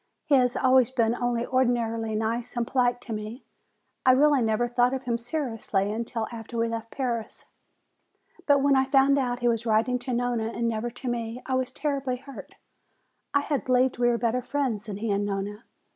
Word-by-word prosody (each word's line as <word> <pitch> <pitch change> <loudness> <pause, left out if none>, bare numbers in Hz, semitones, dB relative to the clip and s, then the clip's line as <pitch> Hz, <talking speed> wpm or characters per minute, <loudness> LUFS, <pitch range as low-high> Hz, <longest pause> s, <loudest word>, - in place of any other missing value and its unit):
He 300 - 0
has 250 -2 +4
always 260 -2 +4
been 235 -3 +1
only 240 -1 -1
ordinarily 230 -3 0
nice 230 +3 -2
and 235 - +1
polite 245 -1 +1
to 230 - -5
me. 215 +4 -6 0.6
I 255 - +6
really 285 0 +4
never 225 +1 +1
thought 245 +2 +2
of 260 - -5
him 235 -2 -1
seriously 230 -6 -2
until 225 0 -3
after 230 0 -7
we 230 0 +1
left 230 0 -5
Paris. 240 -5 -4 1.0
Then 280 -2 +4
when 280 -1 +4
I 265 0 +3
found 275 +1 +4
out 245 -2 -2
he 240 - +2
was 230 0 0
writing 225 +3 +2
to 250 +1 -5
Nona 240 -2 -1
and 235 0 0
never 230 +1 -2
to 245 +2 -9
me, 235 0 -3
I 260 - -3
was 260 0 0
terribly 275 -4 -2
hurt. 275 +2 -11 0.8
I 285 - +5
had 285 -1 -2
believed 255 0 +2
we 240 - +3
were 235 - +2
better 235 +1 0
friends 250 -5 -2
than 200 -2 -5
he 220 +1 -2
and 200 0 +1
Nona. 205 +2 -4
240 Hz, 195 wpm, -26 LUFS, 225-260 Hz, 1.0 s, I